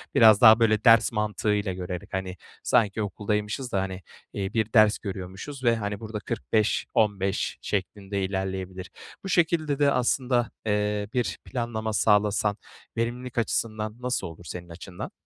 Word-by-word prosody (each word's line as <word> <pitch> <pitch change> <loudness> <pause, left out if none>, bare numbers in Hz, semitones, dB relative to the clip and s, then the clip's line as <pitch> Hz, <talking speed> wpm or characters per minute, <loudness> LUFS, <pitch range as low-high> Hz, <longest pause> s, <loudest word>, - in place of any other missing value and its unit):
biraz 110 -3 +7
daha, 110 -1 +9
böyle, 110 -1 +3
ders 115 -1 +6
mantığıyla 105 -2 -1
görerek, 90 -1 -6
hani, 95 -1 -3 0.3
sanki 110 -3 +2
okuldaymışız 105 +5 -2
da, 95 - +1
hani, 95 -1 -5 0.3
eee, 95 0 -3
bir 110 0 -1
ders 110 -2 +6
görüyormuşuz 100 +8 -7
ve, 120 -1 +4
hani, 105 -2 -3
burada 110 -1 -5
45, 110 -1 0
15 100 -3 0
şeklinde 100 0 -3
ilerleyebilir. 95 -1 -4 0.3
Bu 195 - -5
şekilde 160 -5 +1
de 145 -1 +4
aslında, 125 -2 +1
eee, 105 -1 0
bir 125 -2 -1
planlama 115 -3 -3
sağlasan 105 0 +2 0.4
verimlilik 120 +2 -3
açısından 110 -1 -1
nasıl 125 0 -1
olur 85 +1 -11
senin 90 -1 -7
açından? 90 +2 -8
105 Hz, 140 wpm, -26 LUFS, 95-115 Hz, 0.4 s, daha